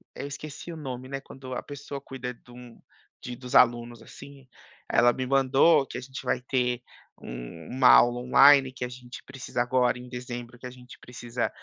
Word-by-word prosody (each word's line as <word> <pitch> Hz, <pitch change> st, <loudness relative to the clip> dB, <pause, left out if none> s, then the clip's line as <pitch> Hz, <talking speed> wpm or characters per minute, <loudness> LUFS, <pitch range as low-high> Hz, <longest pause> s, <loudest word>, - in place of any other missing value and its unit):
eu -, -, -6 dB
esqueci 150 Hz, +3 st, -8 dB
o -, -, -9 dB
nome, 130 Hz, -4 st, -6 dB
né, 135 Hz, 0 st, -5 dB
quando 130 Hz, -1 st, -10 dB
a -, -, -3 dB
pessoa 140 Hz, -1 st, -8 dB
cuida 130 Hz, -2 st, -6 dB
de 120 Hz, +1 st, -20 dB
um 120 Hz, -1 st, -13 dB, 0.4 s
de 125 Hz, -, -6 dB
dos 125 Hz, -1 st, -7 dB
alunos, 120 Hz, -1 st, +3 dB
assim, 140 Hz, +3 st, -13 dB, 0.5 s
ela 120 Hz, +1 st, +5 dB
me 130 Hz, -, -3 dB
mandou 135 Hz, +3 st, +4 dB
que -, -, -7 dB
a -, -, -5 dB
gente 130 Hz, +1 st, -9 dB
vai 125 Hz, 0 st, 0 dB
ter, 125 Hz, -1 st, -1 dB, 0.4 s
uma 80 Hz, -, -2 dB
aula 120 Hz, 0 st, +6 dB
online 135 Hz, +2 st, +6 dB
que 125 Hz, -, -6 dB
a 125 Hz, -, -3 dB
gente 125 Hz, 0 st, -11 dB
precisa 135 Hz, -2 st, -4 dB
agora 125 Hz, 0 st, +1 dB
em 125 Hz, 0 st, -11 dB
dezembro, 125 Hz, -1 st, -7 dB
que 125 Hz, -, -11 dB
a -, -, -9 dB
gente 125 Hz, 0 st, -14 dB
precisa, 120 Hz, -1 st, -4 dB
125 Hz, 190 wpm, -27 LUFS, 120-135 Hz, 0.5 s, aula